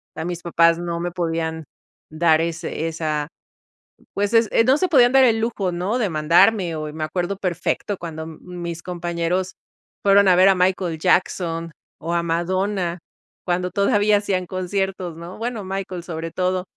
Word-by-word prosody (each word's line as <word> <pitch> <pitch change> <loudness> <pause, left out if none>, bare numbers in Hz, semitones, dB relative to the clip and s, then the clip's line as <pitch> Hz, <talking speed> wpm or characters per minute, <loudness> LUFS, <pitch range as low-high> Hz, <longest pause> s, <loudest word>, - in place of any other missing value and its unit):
A 160 - -4
mis 175 0 -4
papás 170 -1 +3
no 170 -1 -3
me 175 +1 -3
podían 165 -2 -2 0.5
dar 160 0 +3
ese 165 -1 -3
esa, 155 -2 -2 0.9
pues, 205 +2 -1
ese, 230 0 +4
no 260 +4 +4
se, 370 +3 +1
podían 250 -7 +5
dar 265 0 +6
el 225 -2 +3
lujo, 220 -5 -1
¿no? 180 +7 -1
De 210 - 0
mandarme 170 +3 +3
o 155 -1 -5
me 155 - -4
acuerdo 180 +4 -2
perfecto, 180 +2 -2
cuando 160 -2 -6
mis 170 +1 -7
compañeros 175 +1 -2 0.5
fueron 200 0 +5
a 185 - +6
ver 185 +2 +6
a 195 - +4
Michael 180 -2 0
Jackson 170 -2 0 0.3
o 165 +2 -3
a 170 0 +1
Madonna 180 +1 -1 0.5
cuando 180 0 -1
todavía 205 +2 +3
hacían 195 -3 -1
conciertos, 185 -1 -3
¿no? 170 +2 -9
Bueno, 230 -2 -4
Michael, 190 -2 -5
sobre 165 -1 -5
todo 185 0 -1
180 Hz, 160 wpm, -22 LUFS, 165-195 Hz, 0.9 s, dar